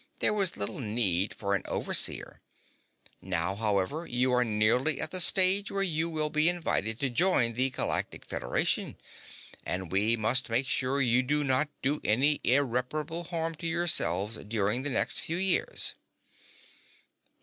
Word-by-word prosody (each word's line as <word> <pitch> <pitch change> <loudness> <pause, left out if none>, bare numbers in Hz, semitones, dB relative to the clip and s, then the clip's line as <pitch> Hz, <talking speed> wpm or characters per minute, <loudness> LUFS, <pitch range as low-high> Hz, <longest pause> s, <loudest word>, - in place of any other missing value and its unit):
There - - +2
was 195 -4 0
little 100 +6 -2
need 105 -5 +1
for 100 -1 -3
an 100 - 0
Overseer. - - -2 0.8
Now, 90 0 -2
however, 105 - -2
you 125 +1 0
are 125 0 +3
nearly 115 +6 +1
at - - 0
the 185 - +2
stage 190 +3 +4
where 195 0 -1
you 165 -2 0
will 155 -2 -3
be 155 +2 +3
invited 120 - -1
to 140 - 0
join 125 -5 +2
the 130 +3 +2
Galactic - - -2
Federation. - - -1 0.7
And 90 -2 -4
we 105 +5 +2
must 125 +4 +2
make 120 +4 +1
sure 140 -1 0
you 125 +1 +2
do 150 +3 -1
not 135 +2 +1
do 145 +3 -1
any 135 +7 +2
irreparable 140 +6 -1
harm 165 -1 -4
to 170 - -3
yourselves 135 - +1
during 105 +2 -2
the 145 - -2
next 130 - -1
few 165 - -4
years." 190 -1 +2
130 Hz, 150 wpm, -28 LUFS, 110-160 Hz, 0.8 s, stage